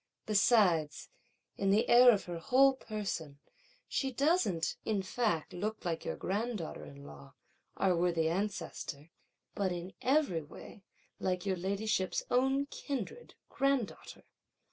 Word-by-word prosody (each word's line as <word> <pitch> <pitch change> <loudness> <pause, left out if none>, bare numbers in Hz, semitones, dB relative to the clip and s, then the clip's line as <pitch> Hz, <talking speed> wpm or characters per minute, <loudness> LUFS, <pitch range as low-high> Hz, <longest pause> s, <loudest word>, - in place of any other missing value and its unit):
Besides, 195 -7 +3 0.5
in 195 - +1
the 205 +3 +3
air 245 +1 +8
of 210 -5 +4
her 175 -1 -6
whole 270 +9 +5
person, 195 - -5 0.5
she 270 -1 -1
doesn't 265 - +1
in 210 -3 -1
fact 190 -5 -1
look 210 +3 -4
like 165 -2 -2
your - - -2
granddaughter 205 - -3
in 70 -1 -12
law, 70 -1 -13 0.4
our 190 -2 +2
worthy 170 -2 +1
ancestor, 170 -4 -4 0.4
but 195 -2 -1
in 175 +1 -5
every 265 - +2
way 155 +6 -12 0.4
like 180 0 -1
your 190 -1 +1
ladyship's 195 +1 -1
own 265 +3 +2
kindred 280 - -6
granddaughter! 275 -5 -2
195 Hz, 125 wpm, -32 LUFS, 170-240 Hz, 0.5 s, air